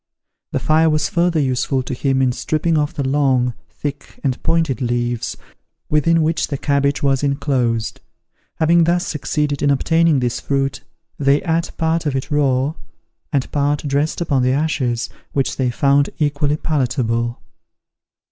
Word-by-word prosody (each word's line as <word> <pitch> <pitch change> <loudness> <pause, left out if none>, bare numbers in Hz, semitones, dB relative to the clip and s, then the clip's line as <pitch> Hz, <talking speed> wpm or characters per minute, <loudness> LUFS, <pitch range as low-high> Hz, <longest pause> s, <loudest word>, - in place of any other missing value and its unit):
The - - -1
fire 160 +1 +3
was 155 -1 +1
further 170 -1 +1
useful 130 -1 0
to 125 - -5
him 135 +1 +1
in 130 - +3
stripping 155 +6 0
off 150 +1 0
the 140 -4 -1
long, 130 -3 +2 0.2
thick, 145 -1 -7
and 130 -3 -1
pointed 160 -6 0
leaves, 120 -1 -1 0.5
within 160 +2 +3
which 160 +1 0
the 140 - -3
cabbage 140 +1 0
was 135 -1 +2
inclosed. 130 -6 -1 0.5
Having 165 +1 +4
thus 175 +1 +1
succeeded 150 -1 -2
in 145 - +2
obtaining 160 +2 +3
this 120 -2 -1
fruit, 135 -1 -1 0.4
they 140 0 +3
ate 165 -1 0
part 160 0 0
of 140 - -1
it 135 +3 -3
raw, 140 -1 +2 0.6
and 140 -4 -1
part 145 0 0
dressed 145 +4 0
upon 140 -6 +1
the 130 +1 +2
ashes, 135 -5 0 0.3
which 135 -2 0
they 130 -2 +1
found 140 +3 +2
equally 145 -1 0
palatable. 120 -6 -1
140 Hz, 150 wpm, -19 LUFS, 130-155 Hz, 0.6 s, Having